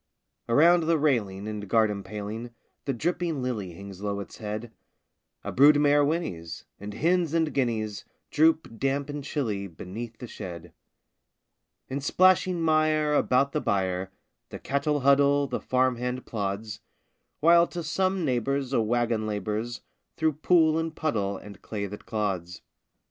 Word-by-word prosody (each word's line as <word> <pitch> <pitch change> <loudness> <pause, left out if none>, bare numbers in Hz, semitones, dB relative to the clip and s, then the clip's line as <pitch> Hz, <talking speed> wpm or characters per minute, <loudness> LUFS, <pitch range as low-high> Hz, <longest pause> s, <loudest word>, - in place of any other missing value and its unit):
Around 165 +7 +5
the 165 -1 +3
railing 105 -10 0
and 105 -1 -5
garden 105 -2 +2
paling 105 +4 -6 0.4
The 135 - 0
dripping 165 +1 -1
lily 105 -8 -3
hangs 100 +1 -10
low 100 -1 -2
its 100 - -9
head: 110 +2 -5 0.7
A - - -4
brood 145 +3 +6
mare 145 0 +4
whinnies; 90 - -3
and 100 +1 -7
hens 170 -1 +1
and 160 -2 +1
guineas 110 -5 -1 0.3
Droop, 155 -6 +2
damp 140 +1 -1
and 145 -1 -5
chilly, 110 -10 -2
beneath 110 +7 -8
the 125 - -7
shed. 90 -7 -8 1.1
In 140 +2 -4
splashing 185 +2 +3
mire 155 -1 +2
about 140 -1 +2
the 150 - -1
byre 95 -1 -1 0.4
The - - -7
cattle 145 +1 -1
huddle, 140 +1 +4
the - - -4
farm 130 -1 +1
hand 125 +1 -3
plods; 105 0 -4 0.6
While 170 +2 +6
to 175 -1 -5
some 185 +2 0
neighbor's 135 +1 -1
a 115 - +3
wagon 115 -1 0
labors 105 +3 -3 0.4
Through 160 -1 +2
pool 160 +1 +3
and 165 -1 -3
puddle 100 -11 -1
and 100 0 -12
clay 105 -2 -4
that 105 +1 -9
clods. 95 -5 -3
125 Hz, 145 wpm, -27 LUFS, 105-150 Hz, 1.1 s, brood